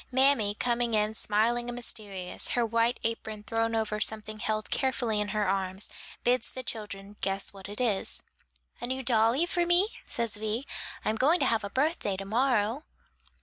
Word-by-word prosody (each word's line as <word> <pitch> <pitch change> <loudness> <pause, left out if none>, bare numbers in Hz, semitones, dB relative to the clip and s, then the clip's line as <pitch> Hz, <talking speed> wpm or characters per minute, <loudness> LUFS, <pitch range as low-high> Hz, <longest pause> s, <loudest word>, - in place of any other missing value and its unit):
Mammy 260 -6 +4
coming 235 0 +1
in 210 0 +2
smiling 230 +3 +1
and 240 - -4
mysterious, 200 -6 -1
her 240 - +3
white 230 +2 +2
apron 220 -2 -3
thrown 225 +1 0
over 215 -1 -1
something 215 -1 0
held 215 0 -2
carefully 240 -5 +1
in 210 - -1
her 210 0 0
arms, 190 0 -1 0.3
bids 245 -1 +3
the 255 - -6
children 205 -3 -6
guess 195 0 -1
what 195 0 -10
it 205 - -6
is. 225 -6 0 0.6
"A 240 - -2
new 260 +1 -2
dolly 235 +5 +3
for 350 0 +1
me?" 350 +4 +4
says 230 -3 0
Vi; 220 +5 -2 0.4
"I'm 220 - +1
going 300 +9 +4
to - - +4
have 225 -2 +2
a 200 - -3
birthday 265 - 0
to 195 - -5
morrow." 235 +2 +1
225 Hz, 175 wpm, -29 LUFS, 210-245 Hz, 0.6 s, Mammy